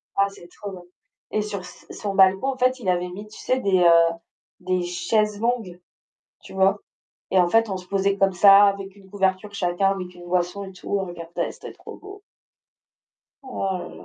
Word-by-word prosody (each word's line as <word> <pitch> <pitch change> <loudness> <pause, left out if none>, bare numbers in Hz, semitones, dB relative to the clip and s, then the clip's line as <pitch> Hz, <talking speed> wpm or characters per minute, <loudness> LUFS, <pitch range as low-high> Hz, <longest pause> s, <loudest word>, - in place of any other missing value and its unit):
ah 200 0 +3
c'est 185 -3 -14
trop 200 +2 -9
bien. 180 -2 -10 0.5
Et 215 -1 0
sur 205 -2 -5
s 180 - -13
son 200 -2 -5
balcon 190 +5 +4
en - - -13
fait 255 +1 +1
il 195 -6 -3
avait 180 0 0
mis, 205 +4 -9
tu 215 - -14
sais, 255 0 -1
des, 190 -5 +2
heu, 170 -1 +5 0.5
des 185 0 -1
chaises 205 +4 0
longues, 225 -7 -2 0.6
tu - - -13
vois? 190 +1 +2 0.5
Et 190 - +4
en 175 - +3
fait 225 +3 +3
on 190 - -3
se 180 - -12
posait 195 0 +1
comme 195 -1 +2
ça 195 +2 +7
avec 195 -1 -2
une 195 -1 -19
couverture 195 +1 -1
chacun, 195 0 +1
avec 180 -2 -5
une 175 0 -13
boisson 180 +2 -1
et 190 - -9
tout, 190 +2 -4
on - - -2
regardait, 170 -1 -5
c'était - - -10
trop - - -12
beau. 400 0 -12 1.2
Oh 195 -7 -3
là 175 - -7
là! - - -13
195 Hz, 205 wpm, -23 LUFS, 180-205 Hz, 1.2 s, ça